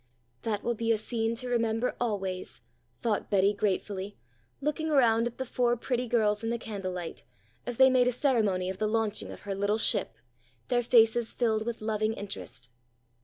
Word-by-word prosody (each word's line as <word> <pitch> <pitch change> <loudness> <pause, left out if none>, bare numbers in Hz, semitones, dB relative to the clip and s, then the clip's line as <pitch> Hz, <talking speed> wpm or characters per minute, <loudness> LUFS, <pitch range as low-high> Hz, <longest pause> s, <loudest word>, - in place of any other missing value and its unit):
"That 210 -2 -2
will 240 - 0
be 230 0 0
a 225 - +3
scene 225 +1 -1
to 250 +2 -5
remember 230 0 0
always," 195 -5 -3 0.4
thought 220 -3 0
Betty 200 0 +3
gratefully, 200 0 -2 0.4
looking 300 +2 -1
around 235 -5 +4
at 240 - -8
the 260 - -3
four 245 -1 +1
pretty 250 +1 -2
girls 215 -2 +1
in 225 - -1
the 235 - 0
candlelight, 185 -6 -5 0.4
as 245 -2 -3
they 265 0 +7
made 250 -1 +4
a - - +3
ceremony 225 -8 +1
of 190 - -9
the 215 - +1
launching 215 -1 -1
of - - -10
her 200 - -4
little 205 +2 0
ship, 225 - +1 0.5
their 245 -1 +3
faces 230 -1 +3
filled 220 -2 +1
with 235 -2 -3
loving 215 0 0
interest. 195 - -8
225 Hz, 175 wpm, -29 LUFS, 205-240 Hz, 0.5 s, they